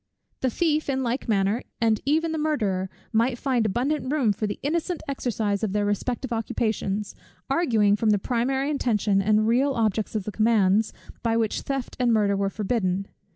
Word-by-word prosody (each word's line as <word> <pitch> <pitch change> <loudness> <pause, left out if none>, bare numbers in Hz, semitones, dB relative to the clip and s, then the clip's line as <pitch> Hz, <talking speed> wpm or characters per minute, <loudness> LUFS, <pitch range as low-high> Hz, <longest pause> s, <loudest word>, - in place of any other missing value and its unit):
The 260 - +1
thief, 310 +3 0
in 265 -1 0
like 245 +1 -2
manner, 200 +2 +2 0.2
and 225 -2 +2
even 320 +3 +2
the 320 - -2
murderer, 210 -12 0 0.2
might 235 +3 +2
find 245 -4 +1
abundant 255 +5 -1
room 260 -9 +2
for 215 +2 -2
the 205 - -4
innocent 335 +4 -1
exercise 225 -6 -1
of 205 -3 -1
their 205 0 +1
respective 240 +5 -2
occupations, 215 -2 -2 0.4
arguing 225 -10 +3
from 215 +1 +1
the 210 - +4
primary 265 +6 0
intention 210 -8 +1
and 215 +2 +3
real 265 +5 +3
objects 220 -1 0
of 210 - 0
the 210 - -5
commands, 215 -1 +3 0.3
by 230 -1 +1
which 225 -2 0
theft 270 -2 -4
and 245 -2 +3
murder 205 -3 +3
were 195 0 0
forbidden. 195 -2 -1
225 Hz, 175 wpm, -25 LUFS, 205-265 Hz, 0.4 s, the